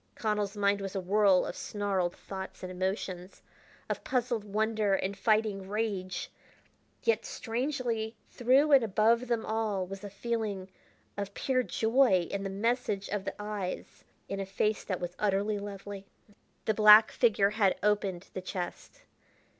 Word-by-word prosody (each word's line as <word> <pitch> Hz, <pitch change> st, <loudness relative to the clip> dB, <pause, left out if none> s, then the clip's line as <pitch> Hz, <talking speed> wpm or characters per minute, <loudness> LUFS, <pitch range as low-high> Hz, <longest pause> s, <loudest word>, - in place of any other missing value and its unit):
Connell's 210 Hz, -2 st, -1 dB
mind 200 Hz, 0 st, +2 dB
was 195 Hz, -1 st, -5 dB
a -, -, 0 dB
whirl 195 Hz, 0 st, +4 dB
of -, -, -5 dB
snarled 195 Hz, -4 st, -1 dB
thoughts 190 Hz, -1 st, -8 dB
and 185 Hz, -, -5 dB
emotions, 185 Hz, 0 st, -4 dB, 0.4 s
of -, -, -3 dB
puzzled 240 Hz, -4 st, 0 dB
wonder 215 Hz, -1 st, +1 dB
and 195 Hz, +1 st, -2 dB
fighting 210 Hz, -2 st, +1 dB
rage; 200 Hz, -3 st, -2 dB, 0.7 s
yet 460 Hz, -, +2 dB
strangely 240 Hz, -, -2 dB
through 265 Hz, +5 st, +3 dB
and 275 Hz, -4 st, +7 dB
above 225 Hz, +4 st, +2 dB
them 230 Hz, -2 st, 0 dB
all 215 Hz, -4 st, -1 dB
was 195 Hz, +2 st, -8 dB
a 205 Hz, -, -5 dB
feeling 205 Hz, -2 st, -3 dB, 0.5 s
of 200 Hz, 0 st, -4 dB
pure 260 Hz, -1 st, +1 dB
joy 225 Hz, -6 st, +3 dB
in 200 Hz, -, -2 dB
the 195 Hz, -, -3 dB
message 210 Hz, 0 st, -1 dB
of 205 Hz, -1 st, -2 dB
the -, -, -4 dB
eyes 210 Hz, -3 st, -5 dB, 0.2 s
in 195 Hz, -, -4 dB
a 195 Hz, -, -2 dB
face 210 Hz, +2 st, 0 dB
that 185 Hz, -3 st, -3 dB
was 175 Hz, 0 st, -5 dB
utterly 205 Hz, +1 st, +1 dB
lovely. 200 Hz, -1 st, -7 dB, 0.6 s
The 220 Hz, -, +2 dB
black 215 Hz, +1 st, +8 dB
figure 205 Hz, -4 st, +3 dB
had 210 Hz, -3 st, +2 dB
opened 200 Hz, -3 st, 0 dB
the 185 Hz, -, -4 dB
chest. 180 Hz, -1 st, -6 dB
205 Hz, 150 wpm, -30 LUFS, 195-225 Hz, 0.7 s, black